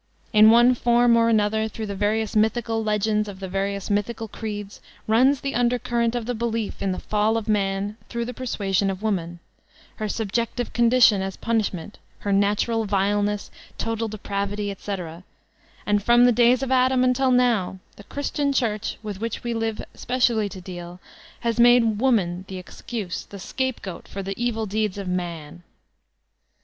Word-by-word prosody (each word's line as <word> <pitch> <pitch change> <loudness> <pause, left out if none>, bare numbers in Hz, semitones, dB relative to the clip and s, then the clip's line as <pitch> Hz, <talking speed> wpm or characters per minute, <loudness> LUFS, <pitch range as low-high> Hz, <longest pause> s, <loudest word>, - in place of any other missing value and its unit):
In 215 0 +8
one 240 +2 +6
form 240 -1 +3
or 230 0 +4
another 220 0 +2
through 220 0 -6
the 200 - -4
various 215 +2 0
mythical 225 +1 +1
legends 210 0 +1
of 190 -2 -9
the 190 - -5
various 195 +1 -2
mythical 220 +2 -1
creeds, 205 -2 -6 0.2
runs 255 +5 +3
the 275 - -3
undercurrent 240 -1 +1
of 240 -2 -2
the 245 - -2
belief 230 -2 -3
in 195 - 0
the 185 - -3
fall 215 +1 +1
of 225 - -4
man 200 0 0
through 235 -1 -3
the 250 - -5
persuasion 200 -6 -1
of 195 +2 -5
woman, 175 -5 -2 0.6
her 215 -1 -3
subjective 230 +3 -2
condition 235 -4 +5
as 190 0 -4
punishment, 210 -5 -2 0.2
her 200 - -1
natural 210 +3 +1
vileness, 205 +1 0 0.3
total 225 0 -2
de* 215 0 -6
pravity, 200 0 -3
etc; 180 -4 -6 0.6
and 205 0 +2
from 240 +3 +5
the 245 - +6
days 245 +2 +4
of 265 - -3
Adam 255 0 +3
until 255 +1 +2
now 240 -7 +2 0.2
the 205 - -13
Christian 285 +2 -2
Church, 225 -6 -1
with 205 -2 -6
which 230 -1 -4
we 240 - -2
have 225 -1 -2
specially 235 -4 +1
to 190 - -9
deal, 175 -1 -8 0.4
has 235 0 -1
made 235 -3 +5
woman 195 -9 +1
the 190 - -6
excuse, 185 +1 -6
the 200 - -10
scapegoat 225 -1 -4
for 195 - -6
the 195 +1 -3
evil 225 -2 -1
deeds 210 -1 -1
of 200 -2 -5
num. 175 -3 -4
215 Hz, 165 wpm, -24 LUFS, 200-235 Hz, 0.6 s, In